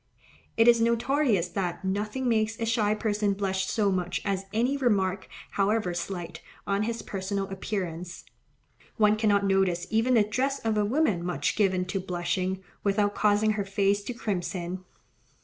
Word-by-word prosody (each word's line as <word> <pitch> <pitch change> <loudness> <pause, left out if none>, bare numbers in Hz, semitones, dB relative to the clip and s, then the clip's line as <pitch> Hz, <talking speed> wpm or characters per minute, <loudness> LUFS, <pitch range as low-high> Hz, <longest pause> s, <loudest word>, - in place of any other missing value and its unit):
It 225 +1 +5
is 235 -1 +6
notorious 235 - +2
that 180 0 -3
nothing 210 +7 -2
makes 220 -1 +1
a 230 - -1
shy 215 -2 +1
person 210 -2 0
blush 190 -1 -1
so 205 -2 +1
much 180 -1 -1
as 195 -1 -1
any 240 +6 +1
remark, 195 -8 0 0.2
however 200 -2 +1
slight, 175 0 -5 0.2
on 200 0 0
his 230 +2 -2
personal 195 0 -3
appearance. 180 -3 -5 0.7
One 210 -1 +4
cannot 205 -2 +2
notice 190 -3 +2
even 225 +3 +3
the 220 - +6
dress 260 +6 -1
of 220 -1 +1
a 210 -1 +2
woman 220 - +1
much 180 0 -1
given 190 -3 +2
to 180 +2 -2
blushing, 185 +1 -2 0.2
without 205 0 +2
causing 210 +1 +3
her 210 -1 -1
face 200 +1 +1
to 245 - -3
crimson. 185 -3 -3
200 Hz, 155 wpm, -27 LUFS, 190-220 Hz, 0.7 s, is